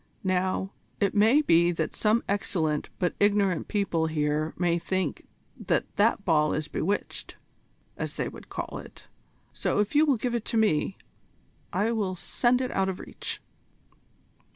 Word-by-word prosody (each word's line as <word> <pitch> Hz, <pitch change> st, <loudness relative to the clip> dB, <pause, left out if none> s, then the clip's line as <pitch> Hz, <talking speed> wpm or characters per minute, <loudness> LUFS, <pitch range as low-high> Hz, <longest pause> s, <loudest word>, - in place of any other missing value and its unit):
Now, 185 Hz, +1 st, 0 dB, 0.3 s
it 200 Hz, -, +2 dB
may 225 Hz, +9 st, +5 dB
be 170 Hz, -, +4 dB
that 160 Hz, -2 st, -2 dB
some 220 Hz, +2 st, +2 dB
excellent 170 Hz, -7 st, -1 dB
but 180 Hz, -2 st, 0 dB
ignorant 200 Hz, -4 st, +2 dB
people 195 Hz, -6 st, 0 dB
here 155 Hz, 0 st, 0 dB
may 175 Hz, -1 st, +2 dB
think 185 Hz, +2 st, -2 dB, 0.4 s
that -, -, 0 dB
that 205 Hz, -1 st, +3 dB
ball 150 Hz, -3 st, +3 dB
is 155 Hz, 0 st, -2 dB
bewitched, 200 Hz, +6 st, -3 dB, 0.6 s
as -, -, -4 dB
they -, -, -1 dB
would -, -, -10 dB
call -, -, -5 dB
it, -, -, -13 dB, 0.5 s
so -, -, -1 dB
if 210 Hz, +4 st, +1 dB
you 305 Hz, +1 st, +5 dB
will 275 Hz, -4 st, +3 dB
give 240 Hz, +2 st, -2 dB
it 235 Hz, -2 st, -2 dB
to 230 Hz, -, -1 dB
me, 195 Hz, -4 st, +2 dB, 0.7 s
I 220 Hz, +3 st, +1 dB
will 205 Hz, -5 st, -1 dB
send 245 Hz, +7 st, +1 dB
it 255 Hz, -, -2 dB
out 190 Hz, 0 st, +1 dB
of 185 Hz, -, -4 dB
reach." -, -, -6 dB
195 Hz, 155 wpm, -27 LUFS, 165-215 Hz, 0.7 s, may